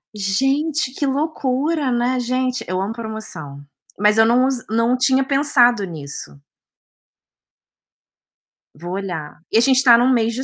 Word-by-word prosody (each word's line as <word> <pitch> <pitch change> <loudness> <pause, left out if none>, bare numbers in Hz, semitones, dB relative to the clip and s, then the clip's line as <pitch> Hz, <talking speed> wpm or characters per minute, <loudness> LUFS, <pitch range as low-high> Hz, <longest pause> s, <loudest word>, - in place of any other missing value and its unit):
Gente, 270 +9 0
que 285 - -3
loucura, 285 0 -1
né. 245 +1 0
Gente, 255 +1 -2
eu 185 0 -2
amo 200 +3 -3
promoção. 215 -11 -8 0.3
Mas 210 +2 +3
eu 225 - +6
não 245 +3 +3
use 260 -2 -3
não 230 +3 +1
tinha 265 +1 +2
pensado 265 -5 +3
nisso. 150 -4 -8 2.4
Vou 175 +4 -8
olhar. 175 -7 -6
E - - +3
a - - +5
gente 265 +1 +3
tá 240 -3 +7
num 245 +2 +2
mês 230 -1 +1
de 255 +3 -4
240 Hz, 145 wpm, -19 LUFS, 205-265 Hz, 2.4 s, tá